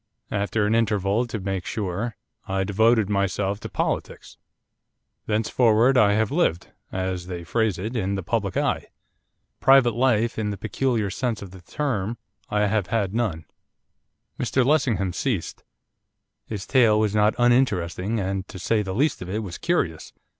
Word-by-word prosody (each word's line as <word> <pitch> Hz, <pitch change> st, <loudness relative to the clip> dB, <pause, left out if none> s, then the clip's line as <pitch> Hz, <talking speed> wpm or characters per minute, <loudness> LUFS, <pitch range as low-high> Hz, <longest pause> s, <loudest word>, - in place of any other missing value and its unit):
After 105 Hz, +1 st, 0 dB
an 105 Hz, -, +1 dB
interval, 110 Hz, 0 st, +1 dB
to 110 Hz, -2 st, -4 dB
make 95 Hz, -1 st, -3 dB
sure, 105 Hz, +1 st, -3 dB, 0.3 s
I 95 Hz, 0 st, 0 dB
devoted 110 Hz, +2 st, +3 dB
myself 100 Hz, 0 st, 0 dB
to -, -, -7 dB
politics. -, -, -3 dB, 0.9 s
Thenceforward 115 Hz, +3 st, +3 dB
I 105 Hz, -4 st, +5 dB
have 110 Hz, +2 st, +1 dB
lived, 145 Hz, -, 0 dB, 0.2 s
as 95 Hz, -1 st, -3 dB
they 90 Hz, -2 st, -5 dB
phrase 105 Hz, +3 st, 0 dB
it, 110 Hz, +7 st, -4 dB
in 100 Hz, -3 st, -1 dB
the 95 Hz, -, -3 dB
public 100 Hz, -2 st, -1 dB
eye. -, -, 0 dB, 0.7 s
Private 135 Hz, -3 st, +5 dB
life, 120 Hz, -2 st, +1 dB
in 110 Hz, -, -1 dB
any 100 Hz, -1 st, -3 dB
peculiar 110 Hz, 0 st, -1 dB
sense 115 Hz, 0 st, -2 dB
of 95 Hz, -, -10 dB
the 95 Hz, -1 st, -12 dB
term, 115 Hz, -, -2 dB, 0.3 s
I 105 Hz, -, +1 dB
have 105 Hz, -2 st, +1 dB
had 105 Hz, -2 st, -1 dB
none.' 105 Hz, -9 st, -1 dB, 0.9 s
Mr 125 Hz, +1 st, +1 dB
Lessingham 125 Hz, -, +1 dB
ceased. 110 Hz, -4 st, -3 dB, 0.8 s
His 100 Hz, -3 st, -5 dB
tale 115 Hz, -5 st, +4 dB
was 105 Hz, -2 st, +1 dB
not 105 Hz, 0 st, +3 dB
uninteresting, 115 Hz, -5 st, +1 dB
and, 95 Hz, 0 st, -2 dB
to -, -, -9 dB
say 105 Hz, +4 st, +1 dB
the 95 Hz, -2 st, -4 dB
least 145 Hz, +7 st, +1 dB
of 90 Hz, -, -6 dB
it, 110 Hz, +3 st, -2 dB
was 90 Hz, -4 st, -7 dB
curious. 95 Hz, -, -1 dB
105 Hz, 155 wpm, -24 LUFS, 95-115 Hz, 0.9 s, I